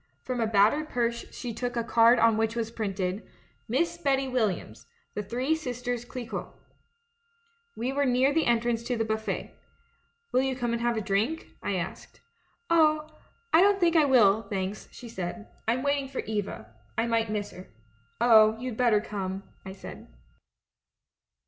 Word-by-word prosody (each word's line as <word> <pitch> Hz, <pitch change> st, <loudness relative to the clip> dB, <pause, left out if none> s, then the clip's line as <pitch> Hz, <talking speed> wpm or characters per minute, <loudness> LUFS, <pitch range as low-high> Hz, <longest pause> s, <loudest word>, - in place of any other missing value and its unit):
From 250 Hz, -2 st, -2 dB
a 225 Hz, -, +2 dB
battered 220 Hz, +9 st, +3 dB
purse 235 Hz, -1 st, -2 dB
she 245 Hz, -2 st, -6 dB
took 245 Hz, +1 st, -3 dB
a 235 Hz, -, +1 dB
card 230 Hz, +1 st, +5 dB
on 230 Hz, -1 st, +4 dB
which 225 Hz, +1 st, 0 dB
was 230 Hz, -1 st, -2 dB
printed: 195 Hz, -3 st, -2 dB, 0.5 s
3Iiss 340 Hz, +8 st, 0 dB
Betty 270 Hz, -1 st, +2 dB
Williams 215 Hz, -, -2 dB, 0.3 s
The 210 Hz, -, -2 dB
Three 250 Hz, +8 st, -1 dB
Sisters 245 Hz, -5 st, -3 dB
Clicquot 240 Hz, -1 st, -6 dB, 1.2 s
"We 255 Hz, +3 st, -2 dB
were 285 Hz, 0 st, +1 dB
near 255 Hz, +3 st, +3 dB
the 320 Hz, +1 st, +2 dB
entrance 235 Hz, -1 st, +1 dB
to 245 Hz, -1 st, -1 dB
the 225 Hz, -, 0 dB
buffet. 220 Hz, 0 st, -3 dB, 0.8 s
'Will 255 Hz, -, +3 dB
you 265 Hz, -1 st, -1 dB
come 240 Hz, -2 st, -2 dB
and 235 Hz, -, -2 dB
have 240 Hz, -1 st, +1 dB
a -, -, 0 dB
drink?' 215 Hz, +11 st, -1 dB
I -, -, -1 dB
asked. -, -, -6 dB, 0.3 s
" 465 Hz, -, -42 dB
'Oh, 310 Hz, -2 st, +3 dB, 0.4 s
I 325 Hz, -, +7 dB
don't 400 Hz, 0 st, +4 dB
think 345 Hz, -2 st, +3 dB
I 310 Hz, -2 st, +6 dB
will, 220 Hz, -6 st, +5 dB
thanks,' 195 Hz, -1 st, -4 dB
she 245 Hz, -, -10 dB
said. 210 Hz, 0 st, -6 dB, 0.2 s
'I'm 240 Hz, +3 st, +1 dB
waiting 280 Hz, -1 st, 0 dB
for 265 Hz, -, -4 dB
Eva 200 Hz, -, -4 dB
— -, -, -34 dB
I 225 Hz, -, +2 dB
might 230 Hz, -1 st, +1 dB
miss 210 Hz, -1 st, -3 dB
her.' 180 Hz, +1 st, -11 dB, 0.3 s
" 115 Hz, +4 st, -38 dB
'Oh, 220 Hz, -2 st, +6 dB
you'd 250 Hz, -2 st, -5 dB
better 235 Hz, -4 st, +3 dB
come,' 195 Hz, -2 st, -4 dB, 0.2 s
I 190 Hz, -, -7 dB
said. 190 Hz, -, -10 dB
235 Hz, 175 wpm, -28 LUFS, 215-260 Hz, 1.2 s, I